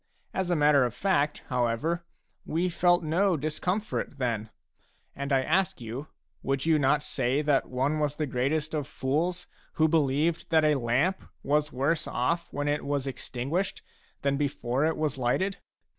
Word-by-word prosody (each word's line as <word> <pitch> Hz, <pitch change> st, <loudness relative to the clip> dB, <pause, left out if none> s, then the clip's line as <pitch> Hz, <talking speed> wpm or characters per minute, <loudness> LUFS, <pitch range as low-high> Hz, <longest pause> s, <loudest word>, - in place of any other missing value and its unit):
As 190 Hz, -2 st, -1 dB
a 175 Hz, -, +2 dB
matter 145 Hz, -3 st, +5 dB
of 120 Hz, -1 st, -2 dB
fact, 150 Hz, -3 st, +1 dB
however, 125 Hz, +7 st, 0 dB, 0.4 s
we 175 Hz, +3 st, 0 dB
felt 175 Hz, 0 st, +3 dB
no 175 Hz, +3 st, +2 dB
discomfort 165 Hz, +3 st, -2 dB
then. 115 Hz, -4 st, -1 dB, 0.7 s
And 140 Hz, +1 st, -4 dB
I 135 Hz, -1 st, +3 dB
ask 185 Hz, +4 st, +1 dB
you, 120 Hz, +5 st, -6 dB, 0.3 s
would 135 Hz, +1 st, -1 dB
you 160 Hz, -2 st, +4 dB
not 145 Hz, +2 st, +3 dB
say 135 Hz, +1 st, 0 dB
that 145 Hz, -2 st, +2 dB
one 135 Hz, +4 st, 0 dB
was 150 Hz, -1 st, 0 dB
the 155 Hz, -, -1 dB
greatest 145 Hz, +4 st, -1 dB
of 150 Hz, -3 st, -2 dB
fools 170 Hz, +7 st, -1 dB, 0.3 s
who 160 Hz, -, +3 dB
believed 155 Hz, +1 st, +1 dB
that 160 Hz, -1 st, +4 dB
a 150 Hz, -, +5 dB
lamp 135 Hz, +8 st, +1 dB, 0.2 s
was 150 Hz, +1 st, +1 dB
worse 145 Hz, +5 st, 0 dB
ofF 170 Hz, +8 st, -1 dB
when 145 Hz, 0 st, -2 dB
it 145 Hz, +1 st, 0 dB
was 140 Hz, -1 st, -1 dB
extinguished 140 Hz, +7 st, -3 dB, 0.4 s
than 140 Hz, 0 st, +1 dB
before 140 Hz, -1 st, 0 dB
it 160 Hz, -, -1 dB
was 150 Hz, -4 st, -1 dB
lighted 185 Hz, +11 st, 0 dB
150 Hz, 160 wpm, -28 LUFS, 135-165 Hz, 0.7 s, matter